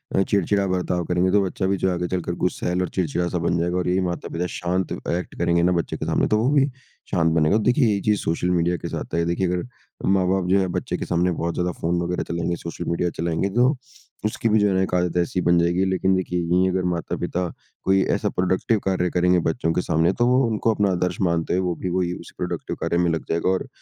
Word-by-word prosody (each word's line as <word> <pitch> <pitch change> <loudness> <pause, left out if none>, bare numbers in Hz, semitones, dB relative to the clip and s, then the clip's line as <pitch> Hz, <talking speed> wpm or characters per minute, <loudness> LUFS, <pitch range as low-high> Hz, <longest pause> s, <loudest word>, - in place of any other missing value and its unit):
अ, 95 - +4
चिड़चिड़ा 100 0 +1
बर्ताव 90 -1 -1
करेंगे, 90 +2 +1
तो 105 - +4
बच्चा 95 +1 -2
भी 100 +1 +1
जो 95 - +1
आगे 90 0 -2
चलकर 90 -2 -2
गुस्सैल 90 0 0
और 90 - -1
चिड़चिड़ा 90 0 0
सा 90 - -2
बन 85 - +2
जाएगा, 90 +1 0
और 90 - -1
यही 90 +1 +2
माता-पिता 85 0 -3
शांत 90 0 -1 0.2
ऐक्ट 90 +2 -3
करेंगे 85 0 +2
ना 90 - +3
बच्चे 85 -2 -1
के - - -4
सामने, - - +1
तो 105 - +2
वो 120 +5 +2
भी 140 -2 +4 0.5
शांत 80 -1 +2
बनेगा। 80 +6 +3
देखिए, 125 +3 +3
ये 105 - +3
ही 100 - -1
चीज़ 105 -1 +1
सोशल 85 +2 -1
मीडिया 85 0 +1
के - - -6
साथ - - -6
है। 85 - +2
देखिए, 85 +2 0
अगर 90 0 -1 0.4
माँ-बाप 95 -1 +2
जो 100 +1 +4
हैं 95 -2 0
बच्चे - - -2
के - - -4
सामने 90 +1 +1
बहुत 85 0 -2
ज़्यादा 90 0 -1
फ़ोन 85 +1 0
वगैरह 90 +1 -2
चलाएँगे, 85 +1 -1
सोशल 85 0 -6
मीडिया, 85 +1 0
चलाएँगे 85 +3 0
तो 125 +4 +4 0.5
उसकी 110 +1 0
भी 110 0 +4
जो 105 - +3
है 100 - +1
ना 95 - +2
एक 95 - -2
आदत 90 -1 0
ऐसी 90 +1 0
बन 85 0 +3
जाएगी 85 +2 +2
लेकिन 95 0 +1
देखिए 90 -1 -1
यहीं 90 +2 +2
अगर 90 0 0
माता-पिता 90 +2 -2 0.4
कोई 95 0 +3
ऐसा - - -1
प्रोडक्टिव 95 +4 +1
कार्य 90 -2 +1
करेंगे 90 +1 +3
बच्चों 80 0 -1
के 90 - +1
सामने 85 +1 +2
तो 120 - +4
वो 125 +2 +4
उनको 110 0 +1
अपना 100 -2 +1
आदर्श 90 0 -1
मानते 85 -2 +1
हैं। 90 - +2
वो 90 -2 -1
भी 90 - -2
वही 90 0 0
उस - - -10
प्रोडक्टिव - - -4
कार्य 85 - 0
में 85 -1 +2
लग 80 - -3
जाएगा 85 +2 +1
और 95 - 0
90 Hz, 245 wpm, -23 LUFS, 85-95 Hz, 0.5 s, अ